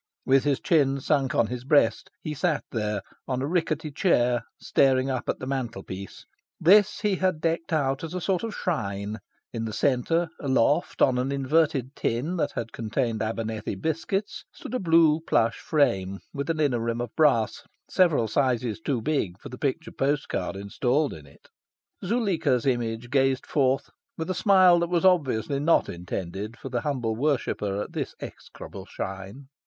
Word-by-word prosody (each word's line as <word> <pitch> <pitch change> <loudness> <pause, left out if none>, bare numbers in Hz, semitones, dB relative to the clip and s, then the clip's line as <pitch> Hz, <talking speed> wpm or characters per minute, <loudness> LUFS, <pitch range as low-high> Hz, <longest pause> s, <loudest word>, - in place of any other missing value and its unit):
With 135 +1 +4
his 140 -2 +2
chin 140 -5 +2
sunk 135 -1 0
on - - +4
his 125 +2 -5
breast, 130 -5 +2
he 155 - -3
sat 150 0 0
there, 105 -3 -2 0.2
on 130 0 -1
a - - 0
rickety 160 -1 -1
chair, 125 -7 +2 0.2
staring 135 0 +2
up 130 -2 -3
at - - 0
the - - -7
mantel 130 -3 -3
piece. 95 +1 -8 0.3
This 205 +4 +5
he 205 -3 +1
had 185 -3 0
decked 165 +1 -1
out 135 -3 0
as 165 +2 -5
a - - -1
sort 185 0 0
of 225 -2 -4
shrine. 105 - -3 0.3
In 115 -1 -3
the 110 - -4
centre, 155 +8 +1
aloft 140 +3 +2
on 125 -2 +3
an 130 +2 -1
inverted 140 -1 +1
tin 135 +10 -1
that - - -1
had 115 - -4
contained 115 0 -2
Abernethy 110 -1 -3
biscuits, 165 - -2
stood - - -10
a 255 - 0
blue 165 -3 +4
plush 115 0 +2
frame, 100 - +1 0.2
with 140 +2 -4
an 165 -1 0
inner 140 -6 +2
rim 115 0 -2
of 120 -2 -5
brass, 140 -9 +3 0.3
several 165 -11 +3
sizes 125 -1 0
too 140 -8 -2
big 105 - -1
for - - -10
the 125 - -8
picture 150 +3 -2
postcard 140 -6 -1
installed 125 +9 0
in 75 -3 -11
it. 70 - -20 0.6
Zuleika's 180 - +1
image 120 -2 -1
gazed 135 -2 +2
forth 135 -2 +1 0.3
with 165 +3 -3
a - - +1
smile 185 -2 +5
that 170 0 -1
was 175 +1 +1
obviously 140 - +2
not 160 +4 +3
intended 95 +5 -5
for 135 - -8
the 120 -2 -1
humble 120 -6 -1
worshipper 110 -7 -1
at - - -11
this - - -4
execrable - - -10
shrine. 95 +8 -7
135 Hz, 170 wpm, -26 LUFS, 115-160 Hz, 0.6 s, This